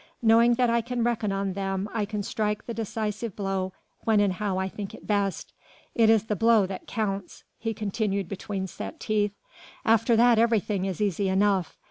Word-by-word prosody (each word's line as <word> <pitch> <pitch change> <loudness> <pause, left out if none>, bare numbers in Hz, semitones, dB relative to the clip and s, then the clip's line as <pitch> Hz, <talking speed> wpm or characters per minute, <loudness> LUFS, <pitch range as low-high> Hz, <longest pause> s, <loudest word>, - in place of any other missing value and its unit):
Knowing 230 +1 +5
that 250 0 +3
I 235 0 +2
can 240 0 -2
reckon 230 -3 0
on 195 -1 -1
them 195 0 -2
I 215 -2 0
can 210 0 -4
strike 210 +1 -2
the 235 - -4
decisive 220 -1 -3
blow 195 -2 -2 0.3
when 220 -2 +2
and 200 -2 +3
how 195 -1 -2
I 190 0 0
think 195 +1 -7
it - - -14
best. 200 -2 -1 0.4
It 225 -2 +4
is 220 -2 +5
the 215 -1 -2
blow 225 -1 +4
that 190 0 -7
counts," 200 -4 -3 0.2
he 225 -1 -3
continued 200 -2 -1
between 195 +1 -4
set 300 - -7
teeth, 210 -2 0 0.5
"after 225 +1 +4
that 235 0 +5
everything 215 -4 +2
is 190 +1 -3
easy 200 -1 +1
enough. 190 -2 +1
210 Hz, 185 wpm, -26 LUFS, 195-225 Hz, 0.5 s, Knowing